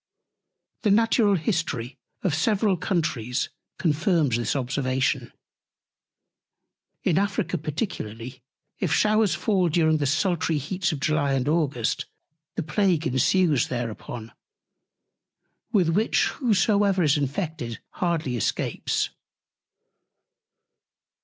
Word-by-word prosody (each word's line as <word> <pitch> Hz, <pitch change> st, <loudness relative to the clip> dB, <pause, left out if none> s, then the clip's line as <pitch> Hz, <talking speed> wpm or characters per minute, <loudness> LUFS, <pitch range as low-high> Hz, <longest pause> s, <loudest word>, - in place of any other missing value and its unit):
The 215 Hz, -, +2 dB
Natural 215 Hz, 0 st, +4 dB
History 150 Hz, -, -2 dB, 0.2 s
of 180 Hz, -, +1 dB
several 195 Hz, +5 st, +2 dB
Countries 155 Hz, -, -1 dB, 0.3 s
confirms 160 Hz, -, +2 dB
this 120 Hz, +1 st, -1 dB
Observation; 130 Hz, 0 st, -1 dB, 1.7 s
in 175 Hz, 0 st, +3 dB
Africa 200 Hz, -2 st, -1 dB
particularly, 130 Hz, -, -5 dB, 0.4 s
if -, -, -1 dB
Showers 215 Hz, -4 st, +3 dB
fall 185 Hz, -2 st, +1 dB
during 160 Hz, -1 st, +3 dB
the 145 Hz, -2 st, 0 dB
sultry 165 Hz, +1 st, +1 dB
Heats 175 Hz, +5 st, -1 dB
of 155 Hz, -, -4 dB
July 145 Hz, -1 st, +1 dB
and 130 Hz, -1 st, 0 dB
August, 145 Hz, -7 st, 0 dB, 0.5 s
the -, -, -2 dB
Plague 165 Hz, 0 st, +1 dB
ensues 145 Hz, +2 st, +2 dB
thereupon, 120 Hz, -1 st, -5 dB, 1.4 s
with 190 Hz, -7 st, +3 dB
which 210 Hz, +7 st, +2 dB
whosoever 205 Hz, -5 st, +2 dB
is 150 Hz, 0 st, +4 dB
infected 145 Hz, -, -3 dB
hardly 165 Hz, -8 st, -1 dB
escapes. 115 Hz, -, -1 dB
160 Hz, 95 wpm, -25 LUFS, 135-190 Hz, 1.7 s, Natural